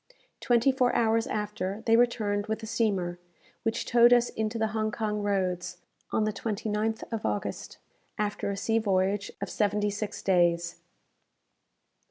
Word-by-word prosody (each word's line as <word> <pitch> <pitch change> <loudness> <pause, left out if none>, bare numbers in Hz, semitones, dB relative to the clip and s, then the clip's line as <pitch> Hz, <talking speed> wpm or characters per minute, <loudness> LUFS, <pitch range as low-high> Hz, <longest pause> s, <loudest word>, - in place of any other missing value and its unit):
Twenty 240 +2 +3
four 255 -2 +1
hours 225 0 +2
after, 210 0 -3
they 225 - +5
returned 215 -4 +1
with 220 +1 -3
a - - -3
steamer, 200 -6 -1 0.4
which 225 0 -1
towed 240 0 +5
us 245 0 +5
into 220 +1 -3
the 220 -1 0
Hong 215 0 -1
Kong 210 -1 -2
roads, 185 -3 -1 0.3
on 220 - +1
the 215 0 0
29th 220 0 -2
of 225 -2 -3
August, 105 -1 -3 0.4
after 210 -1 -2
a 200 - -3
sea 225 +3 +1
voyage 200 -1 0
of - - -4
seventy 210 0 +1
six 205 +1 -5
days. 175 -2 +2
210 Hz, 150 wpm, -28 LUFS, 200-225 Hz, 0.4 s, they